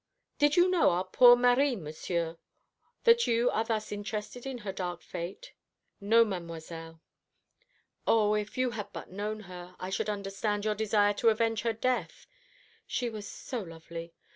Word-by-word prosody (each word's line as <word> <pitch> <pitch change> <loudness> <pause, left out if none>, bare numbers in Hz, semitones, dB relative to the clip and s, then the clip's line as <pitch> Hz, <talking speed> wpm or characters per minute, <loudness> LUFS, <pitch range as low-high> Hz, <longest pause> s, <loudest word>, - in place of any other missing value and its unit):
"Did 295 0 +4
you 350 +1 +6
know 365 -2 +4
our 175 +1 +1
poor 245 +6 +7
Marie, 250 +2 +3
Monsieur, 165 -1 -4 0.6
that 470 0 +5
you 235 +1 +3
are 220 - +1
thus 220 -1 -2
interested 210 +4 -5
in 265 -2 -4
her 195 - -2
dark 180 -2 -5
fate?" 180 - -7 0.5
"No, 225 +3 +5
Mademoiselle." 165 -3 -7 1.1
"O, 210 -2 +4
if 210 +4 -2
you 255 -1 +1
had 205 -3 -6
but - - -8
known 210 +3 -4
her, 180 -2 -10
I 185 - -5
should 195 - -1
understand 205 +1 -2
your 215 - +2
desire 210 -1 +2
to 225 +3 +3
avenge 225 0 +1
her 230 -1 0
death. 250 +3 -2 0.6
She 245 -2 -2
was 210 -2 -7
so 250 - -5
lovely. 165 -1 -9
210 Hz, 160 wpm, -30 LUFS, 180-235 Hz, 1.1 s, poor